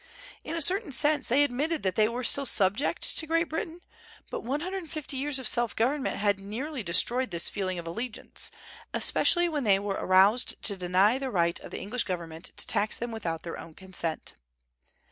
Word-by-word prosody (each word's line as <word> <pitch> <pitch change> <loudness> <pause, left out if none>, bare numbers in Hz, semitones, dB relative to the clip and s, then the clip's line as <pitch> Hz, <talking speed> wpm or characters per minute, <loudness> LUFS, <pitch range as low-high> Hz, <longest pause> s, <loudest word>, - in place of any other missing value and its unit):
In 325 - -4
a 330 - +3
certain 375 0 +1
sense 290 +1 +2
they 270 +5 +4
admitted 290 +4 -1
that 190 -1 +1
they 215 +3 +3
were 245 +2 -4
still 275 +3 +1
subject 200 +7 +2 0.2
to 315 - -4
Great 330 +1 +1
Britain, 325 +2 -4 0.5
but - - -3
one 270 +5 -2
hundred 375 +3 -3
and 335 -4 -11
fifty 300 -2 -5
years 275 +1 -1
of 260 - -2
self 240 -2 +1
government 265 +5 0
had 200 -1 +1
nearly 245 +8 -5
destroyed 235 +8 +3
this 170 0 +1
feeling 185 -3 -3
of 170 - -6
allegiance, 225 +8 -3 0.5
especially 350 -1 +4
when 300 -4 -2
they 200 -4 +5
were 200 0 -3
aroused 195 +6 +4
to 200 - 0
deny 190 +6 +3
the 270 -1 -3
right 170 -6 +1
of - - -10
the - - -6
English 235 +5 -2
government 170 -2 -5
to - - -2
tax 210 0 0
them 240 0 -4
without 170 -8 -4
their 170 - -6
own 160 - -11
consent. 185 -4 -4
235 Hz, 200 wpm, -28 LUFS, 190-290 Hz, 0.5 s, they